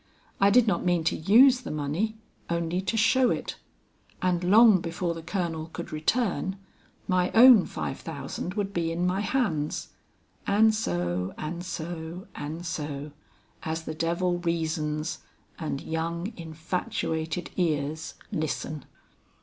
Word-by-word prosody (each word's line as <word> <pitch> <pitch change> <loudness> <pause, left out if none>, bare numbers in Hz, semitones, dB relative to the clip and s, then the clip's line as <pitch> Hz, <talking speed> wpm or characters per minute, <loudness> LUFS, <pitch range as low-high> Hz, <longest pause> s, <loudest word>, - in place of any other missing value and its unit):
I 200 - +6
did 240 +3 +5
not 210 - +1
mean 175 -2 +2
to 165 - +1
use 245 - +6
the - - -7
money, 155 +10 -2 0.3
only 170 +1 -1
to 210 +4 -2
show 245 +3 +4
it; - - -3 0.6
and 180 -1 0
long 210 +1 +7
before 170 +1 -2
the 165 - -7
colonel 165 -2 -3
could - - -6
return, 190 +3 0 0.5
my 180 -1 +2
own 235 -3 +8
five - - -4
thousand 160 +4 -5
would 200 -2 -2
be 165 -2 0
in 170 +2 -1
my 180 +2 +1
hands 190 - -1 0.6
and 220 +2 +5
so, 90 - -2
and 170 +3 -4
so, 170 0 -6
and 160 +4 -6
so, 150 -4 -4 0.5
as 160 0 -3
the 155 - -5
devil 170 +2 0
reasons 160 -2 -2 0.4
and 155 -4 -3
young 170 +5 -3
infatuated 165 0 -3
ears 155 -2 -1 0.2
listen. 155 -1 -3
170 Hz, 135 wpm, -27 LUFS, 160-190 Hz, 0.6 s, own